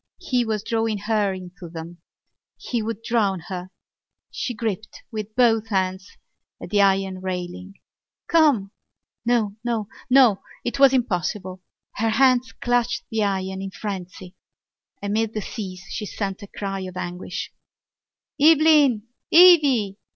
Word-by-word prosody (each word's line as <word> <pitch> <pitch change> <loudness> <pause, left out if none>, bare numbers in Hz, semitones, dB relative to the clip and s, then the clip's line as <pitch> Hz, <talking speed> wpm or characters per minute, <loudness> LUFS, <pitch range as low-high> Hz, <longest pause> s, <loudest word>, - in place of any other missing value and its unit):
He 250 -2 0
was 215 -3 -2
drawing 225 -2 -1
her 210 -1 0
into 180 -1 -9
them: 165 +1 -9 0.6
he 240 -2 -3
would 225 0 -5
drown 210 -5 +1
her. 185 -1 -5 0.6
She 245 - -4
gripped 215 -2 -4
with 215 -1 -6
both 225 -3 +3
hands 190 -2 -1 0.5
at - - -9
the 205 -1 +4
iron 195 -1 +2
railing. 185 +1 -5 0.5
"Come!" 290 - +3 0.6
No! 220 -4 +1
No! 225 -4 -2 0.2
No! 250 -6 +5 0.2
It 240 - -3
was 275 -2 +7
impossible. 185 - -1 0.4
Her 225 +1 +1
hands 255 +2 +3
clutched 245 0 0
the 220 -1 0
iron 190 -1 -2
in 195 - -4
frenzy. 185 -2 -7 0.7
Amid 215 +2 -1
the 215 - -1
seas 185 -4 -7
she 210 - -4
sent 195 0 -4
a 200 - -9
cry 195 -1 -5
of 185 -1 -7
anguish! 175 +1 -5 0.9
"Eveline! 300 -6 +5 0.3
Evvy!" 285 - +6
210 Hz, 130 wpm, -23 LUFS, 190-235 Hz, 0.9 s, was